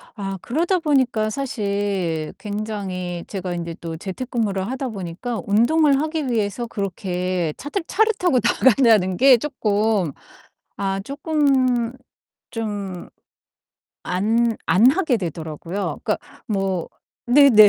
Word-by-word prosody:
아 195 -2 -4
그러다 335 +9 +1
보니까 260 -9 +1
사실 200 - -2
굉장히 200 -5 -4
제가 185 -3 -4
인제 170 -1 -4
또 165 -1 -5
재택근무를 200 -1 -2
하다 260 +1 -3
보니까 200 +4 -4
운동을 275 +7 +4
하기 310 -3 -2
위해서 225 0 -1
그렇게 185 -4 -2
차들 295 +7 -3
차를 440 +3 +3
타고 350 -9 +3
나간다는 220 -8 +4
게 265 -1 +7
쪼끔 215 - 0 0.7
아 195 -1 -1
쪼끔 270 - +1 0.6
좀 205 -5 -5 0.9
안 225 +5 +1
안 195 +10 +6
하게 300 - +1
되더라고요. 165 +2 -4
그러니까 - - +1 0.3
뭐 195 -5 -1 0.4
네네. 245 -5 +8
215 Hz, 240 characters per minute, -22 LUFS, 190-260 Hz, 0.9 s, 네네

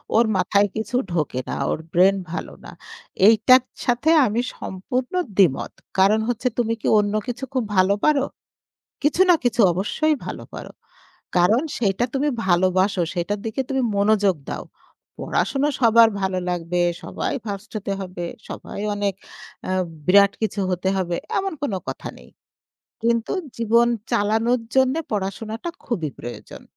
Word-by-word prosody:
ওর 235 - +5
মাথায় 200 +2 +3
কিছু 220 +3 -3 0.2
ঢোকে 150 -6 -1
না। - - -2 0.2
ওর - - -2
ব্রেইন 190 +3 +5 0.2
ভালো - - -5
না। - - -9 0.6
এইটার 250 +3 +6 0.2
সাথে 245 +6 +1 0.2
আমি 225 +1 0 0.2
সম্পূর্ণ 250 - -4 0.2
দ্বিমত। 175 -9 +3 0.3
কারণ 200 +3 +5
হচ্ছে 245 +2 -1
তুমি 230 -1 +1
কি - - -2
অন্য 205 0 0
কিছু 245 +2 -5
খুব 255 -3 +1
ভালো 185 +2 +5
পারো? 290 -3 +3 0.8
কিছু 295 +4 +1
না - - +8
কিছু 245 0 +2
অবশ্যই 255 - 0
ভালো - - -6
করো। - - -8 0.6
কারণ 210 +9 +4 0.2
সেইটা 205 0 +1
তুমি 285 +2 +1 0.2
ভালোবাসো, 185 +1 +2
সেটার 180 +4 -2
দিকে 225 +4 -3
তুমি 265 -1 +1
মনোযোগ 200 -3 +3
দাও। - - -5 0.5
পড়াশুনা 285 +2 0
সবার 230 -1 +6
ভালো 190 -1 0
লাগবে, 175 0 -2 0.2
সবাই - - -3
ফার্স্ট 200 +1 -6
হতে 200 -1 -4
হবে। 180 -2 -5 0.2
সবাই - - -7
অনেক 205 -1 -1 0.6
আ - - 0 0.3
বিরাট 200 +1 +6
কিছু 215 -1 -1
হতে 180 +1 -1
হবে। 175 -2 -1 0.2
এমন 390 -2 -2
কোন 280 - -1 0.2
কথা - - -5
নেই। - - -16 0.7
কিন্তু 230 -1 +1 0.3
জীবন 235 +1 +4 0.3
চালানোর 225 +4 +2 0.2
জন্য 260 +1 +4 0.2
পড়াশোনাটা 215 - -3 0.2
খুবই 170 - -2
প্রয়োজন। 120 0 -9
210 Hz, 145 wpm, -22 LUFS, 190-240 Hz, 0.8 s, না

